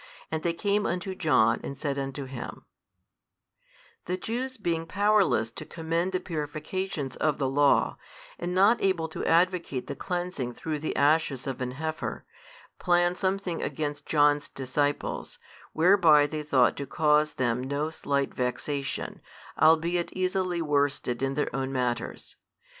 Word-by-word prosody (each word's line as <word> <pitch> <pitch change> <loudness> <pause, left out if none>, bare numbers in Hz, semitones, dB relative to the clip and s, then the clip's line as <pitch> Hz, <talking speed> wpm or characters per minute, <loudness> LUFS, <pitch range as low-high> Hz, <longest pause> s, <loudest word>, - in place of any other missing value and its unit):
And 160 0 -1
they 170 0 0
came 205 +4 0
unto 185 +2 -2
John, 120 -11 +3
and 140 - -6
said 140 -3 -2
unto 135 0 -4
him, 130 -2 -8 1.4
The 180 +1 -2
Jews 255 +6 -4
being 165 -5 -2
powerless 200 - +2
to - - -8
commend 165 +2 -2
the 185 - 0
purifications 155 -2 -4
of 155 -2 +1
the 135 - 0
law, 140 +2 +3 0.4
and 175 +1 -3
not 200 +5 +5
able 185 -4 +1
to - - -5
advocate 170 -6 +2
the - - -5
cleansing 175 -9 -3
through 155 -2 -3
the 155 - -3
ashes 145 -2 +2
of 135 -2 -4
an 125 0 -2
heifer, 155 +3 -4 0.5
plan 175 0 +3
something 190 -2 -1
against 145 -2 -3
John's 145 -1 +3
disciples, 145 +2 -2 0.3
whereby 165 -4 +5
they 155 +1 -4
thought 135 -5 +3
to 140 - -4
cause 150 +1 +2
them 125 -2 0
no 140 +4 -2
slight 140 -3 -1
vexation, 135 +2 -3 0.4
albeit 165 +2 +3
easily 185 -2 0
worsted 140 -4 0
in 135 0 0
their 145 -3 -1
own 135 0 -2
matters. 125 -3 -3
155 Hz, 140 wpm, -27 LUFS, 140-175 Hz, 1.4 s, not